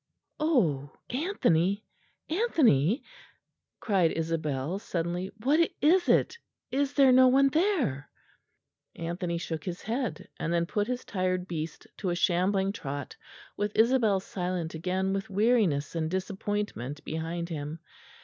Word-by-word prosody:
"Oh, 175 - +2 0.2
Anthony, 205 - +1 0.4
Anthony!" 270 - +3 0.8
cried 190 -6 +2
Isabel 160 0 -2
suddenly, 175 0 -3
"what 290 +5 +3 0.2
is 350 +5 +4
it? 470 - +3 0.3
Is 280 +1 0
there 275 -2 +6
no 255 0 +7
one 275 +2 +5
there?" 295 - 0 0.9
Anthony 170 +1 -3
shook 160 -2 -4
his 175 +1 -5
head; 240 +3 -3
and 165 - -2
then 170 0 +2
put 205 +4 -1
his 250 0 -3
tired 185 -2 -1
beast 160 -2 -5
to 190 - -2
a 175 - 0
shambling 190 +3 +2
trot 145 -7 -6 0.4
with 205 +1 -2
Isabel 225 -4 +4
silent 180 -3 -3
again 185 +4 -1
with 195 0 -3
weariness 200 -8 +2
and 160 -2 -1
disappointment 190 - -3
behind 165 +2 -3
him. 150 -1 -4
185 Hz, 125 wpm, -28 LUFS, 165-240 Hz, 0.9 s, no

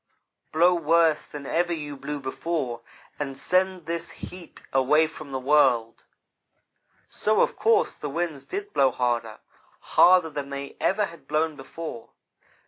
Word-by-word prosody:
Blow 175 +3 +4
worse 165 -1 +2
than 145 -1 -8
ever 175 +4 0
you 150 -3 -4
blew 145 +1 -5
before, 130 -2 -3 0.4
and 135 -2 -4
send 185 +1 +1
this 170 +1 -3
heat 180 -2 -11
away 135 +4 +4
from 155 -2 -9
the 135 - -2
world.' 130 -5 +2 1.0
"So, 215 0 +1
of - - +1
course, 445 -1 +2
the 150 - -6
winds 160 -2 -3
did 405 +1 -5
blow 135 - +4
harder 120 -3 -1 0.6
harder 180 -3 +6
than 140 -1 -5
they 140 0 -6
ever 210 +2 +2
had 170 -3 -13
blown 155 +1 0
before. 135 -3 -8
155 Hz, 140 wpm, -25 LUFS, 135-170 Hz, 1.0 s, harder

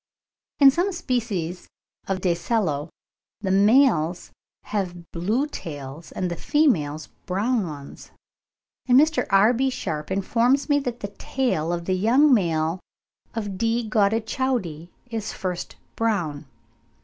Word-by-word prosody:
In 275 -2 +9
some 350 +7 0
species 215 - -2 0.4
of 190 -1 -2
Dacelo 175 -4 0 0.5
the 190 -2 -1
males 195 - +3 0.3
have 175 -5 -4
blue 210 +11 0
tails, 150 - -8
and 180 -1 -3
the - - -2
females 160 - +1 0.2
brown 205 +2 0
ones; 145 -3 -9 0.8
and 250 +1 +7
Mr. 310 +1 +2
R.B. 225 +7 +4
Sharpe 155 -11 -4
informs 235 +8 +1
me 290 0 +4
that 245 -3 -5
the 205 - -4
tail 205 -12 -1
of 170 -1 -3
the 185 - 0
young 250 +10 +4
male 165 -4 +1 0.6
of 205 -4 -4
D. 230 0 0
gaudichaudi 215 - 0 0.2
is 225 -2 -3
at - - -10
first 180 -2 -4 0.2
brown. 175 -11 -1
200 Hz, 125 wpm, -24 LUFS, 170-245 Hz, 0.8 s, In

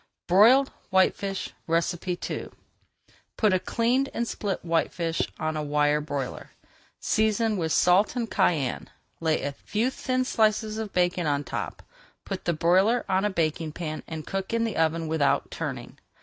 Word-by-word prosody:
BROILED 235 +9 +6 0.2
WHITEFISH 195 +1 +1 0.2
II 170 +2 -2 0.9
Put 215 -4 +3
a 185 - +3
cleaned 245 +7 +1
and 235 - -1
split 200 -5 -3
whitefish 165 0 0 0.2
on 155 0 -1
a 155 - -1
wire 150 0 +2
broiler, 145 -3 -5 0.5
season 220 0 +1
with 165 -4 -1
salt 180 +9 +4
and 240 -2 -1
cayenne, 160 - 0 0.3
lay 160 -3 0
a 140 - -1
few 215 - -2
thin 255 -1 -1
slices 215 -2 +1
of 215 -2 -4
bacon 180 -2 +1
on 145 0 0
top, - - -5 0.4
put 195 -2 -5
the 170 - +2
broiler 190 +9 +3
on 190 0 +1
a - - +2
baking 160 -3 -1
pan, 155 -2 -5
and 160 -2 -6
cook 195 +2 -4
in 230 - +1
the 225 - -2
oven 160 0 +1
without 155 -3 +1
turning. - - -6
180 Hz, 150 wpm, -26 LUFS, 160-215 Hz, 0.9 s, BROILED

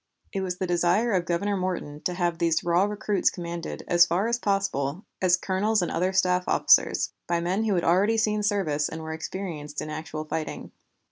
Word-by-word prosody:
It 195 - -1
was 180 -1 -3
the 185 - -2
desire 175 +6 +2
of 180 -3 +1
Governor 200 +4 0
Morton 180 -6 -3
to 180 - -1
have 175 -2 -1
these 165 -2 +1
raw 175 +2 +3
recruits 210 -1 0
commanded, 170 -1 -6
as 175 0 +6
far 180 +6 +1
as 235 +1 0
possible, 195 - -1 0.2
as 180 -1 +4
colonels 195 +3 0
and - - -2
other 180 +3 0
staff 180 -1 +2
officers, - - +3 0.2
by 170 -1 +1
men 185 +6 0
who 210 -3 +1
had 175 - 0
already 200 +6 +3
seen 215 -1 +1
service 190 -8 0
and 160 0 -7
were 160 0 -5
experienced 160 -3 -5
in 155 - -5
actual 155 0 -5
fighting. 155 0 -5
180 Hz, 195 wpm, -26 LUFS, 165-195 Hz, 0.2 s, as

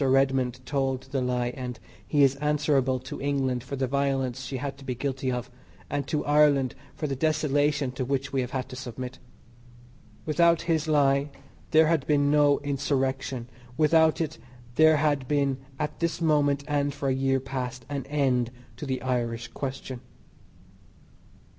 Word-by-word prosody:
Redmond 130 -2 +2
told 135 -2 -1
the 135 -2 0
lie 125 -1 0
and 125 -3 -5 0.3
he 145 -2 +4
is 135 -1 +5
answerable 145 -3 +1
to 130 - -7
England 135 -3 0
for 140 - -5
the 135 0 0
violence 135 -1 0
she 130 +1 -4
had 140 +1 -4
to - - -12
be 130 -2 -3
guilty 130 0 -2
of, 125 +1 -4 0.4
and 140 -1 -1
to 150 - -1
Ireland 145 -3 +4 0.2
for 155 - -3
the 140 -2 -1
desolation 145 -1 +1
to 130 +1 -3
which 135 +1 -2
we 135 - +2
have 125 - -3
had 130 0 -3
to - - -7
submit. 125 0 -6 1.1
Without 170 +1 +3
his 160 -2 0
lie 140 -1 +3 0.4
there 160 0 +6
had 160 -3 +1
been 145 -1 +3
no 145 -1 +5
Insurrection; 135 -3 -1 0.3
without 160 0 +4
it 160 -2 -3 0.3
there 155 +3 +6
had 145 -3 +1
been 140 -2 +1 0.2
at 150 +1 -3
this 170 -1 -1
moment, 145 -3 +2
and 145 -1 0
for 140 - -3
a 135 - +2
year 135 0 +1
past, 130 -1 -5
an 140 -2 -4
end 130 -5 +1 0.3
to 150 - -6
the 130 -1 -2
"Irish 120 -2 -1
question." 130 -1 -5
135 Hz, 165 wpm, -27 LUFS, 130-145 Hz, 1.1 s, there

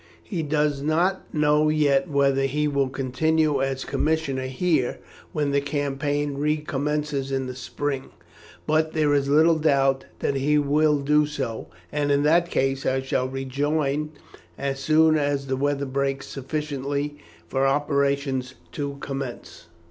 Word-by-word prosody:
He 180 -6 -3
does 150 -2 0
not 170 +6 0
know 150 0 +3
yet 145 -2 +2
whether 140 -1 +2
he 150 +3 0
will 140 -2 +1
continue 145 +3 +1
as 135 0 -2
commissioner 145 -4 -1
here 135 -1 0 0.3
when 145 -2 0
the 140 0 +2
campaign 145 0 -2
recommences 150 -1 -1
in 135 -1 -1
the 130 - -5
spring; 135 +1 -4 0.6
but 155 +1 +1
there 150 -2 +2
is 140 -1 +1
little 160 +2 +5
doubt 135 -3 +2
that - - -1
he 140 +2 +2
will 150 +1 +3
do 150 +1 +3
so, 115 -6 -4 0.2
and 145 -1 0
in 140 0 +3
that 170 +3 +3
case 135 -2 0
I 130 0 0
shall 130 -1 -1
rejoin 140 +3 -1 0.5
as 140 0 -2
soon 155 +3 +4
as 145 -1 0
the 135 -1 -1
weather 140 +1 0
breaks 135 0 -2
sufficiently 145 +1 -3 0.3
for 135 +8 +1
operations 140 -2 0 0.2
to 140 -1 -4
commence. 135 -9 -6
145 Hz, 140 wpm, -24 LUFS, 135-150 Hz, 0.6 s, little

